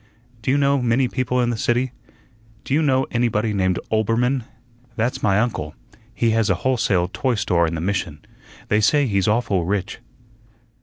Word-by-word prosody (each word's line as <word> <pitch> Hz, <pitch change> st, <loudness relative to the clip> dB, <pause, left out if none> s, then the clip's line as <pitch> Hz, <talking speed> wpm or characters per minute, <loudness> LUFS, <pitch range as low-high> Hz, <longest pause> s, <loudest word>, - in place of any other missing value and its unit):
"Do 110 Hz, -, -3 dB
you 135 Hz, -, +3 dB
know 140 Hz, -1 st, +2 dB
many 125 Hz, +2 st, +2 dB
people 125 Hz, 0 st, -1 dB
in 120 Hz, 0 st, +1 dB
the 115 Hz, -, -3 dB
city? 120 Hz, +3 st, 0 dB, 0.7 s
Do -, -, -3 dB
you 155 Hz, -, +3 dB
know 135 Hz, -3 st, +2 dB
anybody 115 Hz, -2 st, 0 dB
named 95 Hz, -2 st, +1 dB
Oelbermann? 115 Hz, +3 st, +1 dB, 0.5 s
That's 115 Hz, +3 st, -1 dB
my 100 Hz, -1 st, +2 dB
uncle. 90 Hz, -10 st, -2 dB, 0.4 s
He 115 Hz, 0 st, 0 dB
has 110 Hz, -1 st, +1 dB
a 95 Hz, -, +3 dB
wholesale 105 Hz, -9 st, +2 dB
toy 130 Hz, -3 st, 0 dB
store 90 Hz, -5 st, +1 dB
in 80 Hz, -, -3 dB
the 80 Hz, -, -4 dB
Mission. 85 Hz, -5 st, -3 dB, 0.4 s
They 105 Hz, +1 st, +3 dB
say 145 Hz, +6 st, +3 dB
he's 100 Hz, -6 st, 0 dB
awful 105 Hz, -5 st, +1 dB
rich." 95 Hz, +3 st, -2 dB
115 Hz, 170 wpm, -21 LUFS, 100-125 Hz, 0.7 s, you